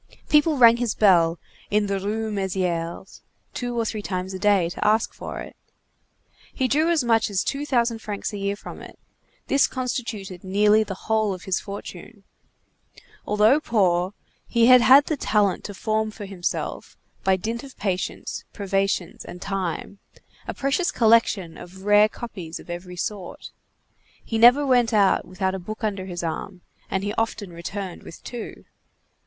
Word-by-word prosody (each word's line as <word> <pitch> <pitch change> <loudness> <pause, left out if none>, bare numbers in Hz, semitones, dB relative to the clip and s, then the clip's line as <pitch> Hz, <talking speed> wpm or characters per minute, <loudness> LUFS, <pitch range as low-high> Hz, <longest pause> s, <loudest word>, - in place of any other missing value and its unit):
People 300 0 +4
rang 235 -2 +7
his 240 -3 -1
bell, 175 -5 +4 0.3
in 210 0 +2
the 200 -1 -1
Rue 215 +3 -2
Mésières, 185 -3 -3 0.3
two 245 -1 -3
or 230 - 0
three 215 -1 -3
times 185 -1 -4
a 190 - -5
day, 200 -4 +3
to 175 - -5
ask 215 +1 +2
for - - -7
it. - - -10 1.0
He 260 - 0
drew 310 +6 +2
as 330 -5 +2
much 225 -2 +2
as 195 -2 0
two 285 +1 -3
thousand 235 -4 +1
francs 210 -1 -5
a 205 - -4
year 200 0 -1
from - - -10
it; - - -12 0.5
this 275 - +3
constituted 230 -8 -4
nearly 210 +3 +4
the 195 -3 -7
whole 215 -3 +1
of 185 - -12
his 190 -1 0
fortune. 200 +1 -9 1.0
Although 210 +7 +4
poor, 190 - +1 0.3
he 235 -1 +3
had 250 0 +8
had 270 +4 +7
the 310 - -1
talent 210 -7 +1
to 205 - -6
form 220 +1 -1
for 210 -1 -8
himself, 190 -3 -4 0.3
by 190 0 +3
dint 225 +5 -4
of 270 -2 -12
patience, 190 -3 -3
privations, 195 -3 -1
and 180 - -9
time, 195 0 -4 0.5
a - - -4
precious 275 +7 0
collection 225 - +2
of 190 +2 -12
rare 210 +1 +5
copies 185 -9 -7
of - - -10
every 180 +1 -7
sort. 190 -1 -5 0.7
He 225 - -2
never 250 +5 +7
went 245 -3 +3
out 200 -2 +3
without 190 0 -2
a 190 - -3
book 215 +5 -8
under 195 -3 -2
his 175 -2 -5
arm, 180 +3 -5 0.3
and 190 0 -1
he 205 +1 -2
often 210 -5 -3
returned 185 +2 -6
with - - -12
two. 240 -2 -8
205 Hz, 165 wpm, -24 LUFS, 190-230 Hz, 1.0 s, had